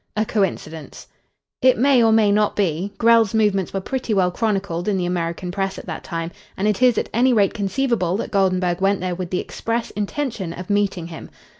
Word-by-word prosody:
"A 215 - +2
coincidence." 165 -7 -3 0.6
"It 255 -1 +5
may 270 +3 +4
be 235 - +5
or 225 - +4
may 220 -2 +4
not. 210 0 +1 0.4
Grell's 230 -2 +4
movements 205 -4 +1
were 195 - -3
pretty 250 0 -2
well 180 -2 +2
chronicled 195 -4 -2
in 205 -2 +1
the 180 - -1
American 175 0 -2
Press 195 0 -2
at - - -8
that 160 - -6
time, 165 0 -4 0.3
and 200 - 0
it 210 +2 0
is 250 -2 +4
at - - 0
any 250 +3 +3
rate 200 -4 +3
conceivable 205 -3 0
that - - -5
Goldenburg 185 -2 +1
went 195 0 +2
there 180 0 -2
with 175 0 -5
the 180 - -1
express 230 +1 -3
intention 210 - -3
of 180 +3 -6
meeting 200 -4 0
him. 165 -1 -9
200 Hz, 200 wpm, -21 LUFS, 180-225 Hz, 0.6 s, It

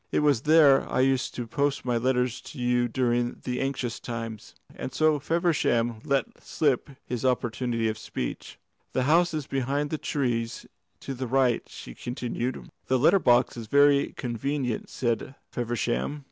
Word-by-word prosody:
"It - - +2
was 145 -6 +3
there 150 -2 +5
I - - +2
used 130 -1 +1
to 120 - -3
post 140 +4 -1
my 125 -1 +1
letters 125 0 0
to - - -11
you 120 0 +2
during 120 0 0
the 125 0 -2
anxious 135 -3 -2
times." 115 -2 -6 0.2
And - - -6
so 155 +2 +2
Feversham 140 -8 +1
let 140 -1 -1
slip 145 -3 0 0.2
his 125 -1 -4
opportunity 120 -2 0
of 110 0 -2
speech. 60 - -5 0.4
"The 130 - +1
house 170 +5 +4
is 155 -3 -3
behind 140 +2 -1
the 155 - -2
trees 120 -6 -2 0.4
to 135 - -5
the 130 0 -4
right," 130 -1 +2
she - - -9
continued. 120 - -4 0.2
"The 130 - +3
letter 155 +10 +5
box 125 -5 +3
is 115 -2 -7
very 140 +2 +4
convenient," 125 0 -2
said 120 +2 -2 0.2
Feversham. 120 +4 -2
125 Hz, 160 wpm, -27 LUFS, 120-140 Hz, 0.4 s, there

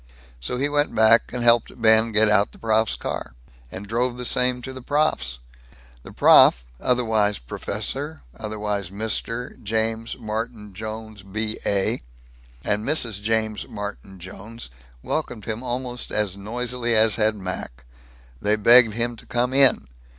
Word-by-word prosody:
So 60 - -4
he 140 +3 +1
went 145 0 0
back 110 +1 +5
and 125 -1 -3
helped 120 0 +3
Ben 110 0 +4
get 110 0 +4
out 105 0 +3
the - - -15
prof's 110 0 +1
car, - - -5 0.4
and 100 - -7
drove 120 +3 -1
the 125 - -5
same 125 0 +1
to 130 - -6
the 130 - -8
prof's. 125 - 0 0.6
The - - -12
prof, - - +6 0.2
otherwise 110 -5 +1
professor, 145 - -5
otherwise 105 -3 -3
mister, 110 +4 -3
James 110 +1 -1
Martin 110 -1 -5
Jones, 110 0 -7
B.A., 100 0 -2 0.6
and 105 +1 0
Mrs. 115 -7 -1
James 110 0 -1
Martin 100 -2 -7
Jones 100 - -10 0.3
welcomed 110 -5 -3
him 110 +1 -4
almost 125 0 -4
as 105 -3 -1
noisily 120 +3 -2
as 110 0 +4
had 110 -1 +2
Mac. 90 -11 -6 0.6
They 105 +1 +2
begged 115 +1 +6
him 120 +1 -1
to - - -13
come 125 +2 0
in. 135 - +5
110 Hz, 145 wpm, -23 LUFS, 105-120 Hz, 0.6 s, prof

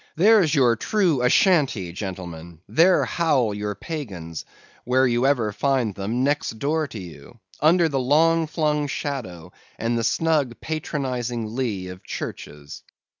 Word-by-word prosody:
There's 185 -3 +4
your 125 -4 +4
true 170 - +1
Ashantee, 130 - +3
gentlemen; 85 -4 -7
there 175 +3 +4
howl 145 -11 +1
your 105 0 -4
pagans; 95 - -6 0.4
where 130 +1 +2
you 120 +1 +2
ever 120 -7 +1
find 130 -3 0
them, 110 +7 -2
next 140 -5 -1
door 155 +5 0
to 110 - -8
you; 90 -4 -12 0.2
under 165 +3 +4
the 140 -4 -1
long 160 +5 +3
flung 150 -2 0
shadow, 110 - -5 0.3
and 115 +1 -1
the - - -1
snug 145 -2 0
patronising 125 -7 -3
lee 105 -8 -2
of 90 0 -10
churches. 75 0 -7
130 Hz, 135 wpm, -23 LUFS, 105-155 Hz, 0.4 s, There's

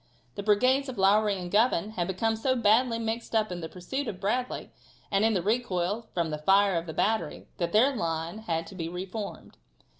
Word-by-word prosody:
The 200 - -5
brigades 255 +7 +3
of 255 - -7
Lowrey 200 +1 +3
and 175 -1 -6
Govan 215 -2 +2
had 175 -5 -2
become 220 +4 0
so 260 +4 0
badly 230 +1 +3
mixed 230 +1 -3
up 215 -3 +2
in 175 -1 -4
the 160 - -5
pursuit 260 +10 -4
of 185 - -5
Bradley, 245 +6 -2 0.4
and 195 +1 +2
in 225 -1 +3
the 180 - 0
recoil 210 -1 -1
from 170 -3 0
the 150 - -3
fire 195 +5 +4
of 170 0 -2
the - - -4
battery, 205 -7 -1
that 170 -1 -1
their 260 +6 +4
line 165 0 -3
had 165 -6 -2
to - - -11
be 165 -2 -4
reformed. 190 +4 -6
205 Hz, 205 wpm, -28 LUFS, 175-225 Hz, 0.4 s, fire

